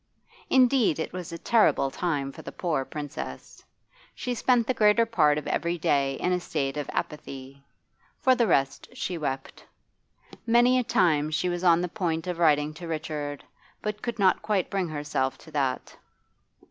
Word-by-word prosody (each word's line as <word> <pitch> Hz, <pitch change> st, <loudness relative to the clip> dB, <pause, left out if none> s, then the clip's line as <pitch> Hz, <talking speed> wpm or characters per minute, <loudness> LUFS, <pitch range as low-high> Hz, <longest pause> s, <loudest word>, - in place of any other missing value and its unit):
Indeed 255 Hz, -, +4 dB
it 160 Hz, -, -4 dB
was 180 Hz, -2 st, -6 dB
a 170 Hz, -, -5 dB
terrible 210 Hz, -, +3 dB
time 145 Hz, -5 st, -2 dB
for -, -, -11 dB
the -, -, -8 dB
poor 155 Hz, -7 st, -1 dB
Princess. 145 Hz, 0 st, -7 dB, 0.5 s
She 250 Hz, -, -3 dB
spent 245 Hz, 0 st, +2 dB
the 255 Hz, -, 0 dB
greater 215 Hz, 0 st, +4 dB
part 155 Hz, -10 st, +3 dB
of 150 Hz, -, -4 dB
every 170 Hz, +1 st, -1 dB
day 140 Hz, -4 st, +1 dB
in 180 Hz, -, -1 dB
a 180 Hz, -, +1 dB
state 140 Hz, -5 st, -2 dB
of 145 Hz, -1 st, -4 dB
apathy; 140 Hz, -2 st, -6 dB, 0.6 s
for 260 Hz, -, +4 dB
the 240 Hz, -3 st, +2 dB
rest 135 Hz, -5 st, +1 dB
she 185 Hz, -, -3 dB
wept. 135 Hz, -3 st, -4 dB, 0.8 s
Many 240 Hz, +2 st, +5 dB
a -, -, 0 dB
time 155 Hz, -8 st, +2 dB
she 165 Hz, +4 st, 0 dB
was 175 Hz, 0 st, -3 dB
on 170 Hz, -1 st, +5 dB
the 180 Hz, -, -1 dB
point 165 Hz, -4 st, -2 dB
of 180 Hz, -2 st, -4 dB
writing 150 Hz, -2 st, +3 dB
to 170 Hz, +2 st, -9 dB
Richard, 150 Hz, -3 st, -4 dB, 0.4 s
but 210 Hz, 0 st, -3 dB
could 235 Hz, -1 st, -4 dB
not 190 Hz, -3 st, +3 dB
quite 200 Hz, -4 st, -1 dB
bring 195 Hz, -3 st, 0 dB
herself 145 Hz, -3 st, -2 dB
to 160 Hz, -, -15 dB
that. 135 Hz, -4 st, -2 dB
165 Hz, 170 wpm, -27 LUFS, 145-210 Hz, 0.8 s, Many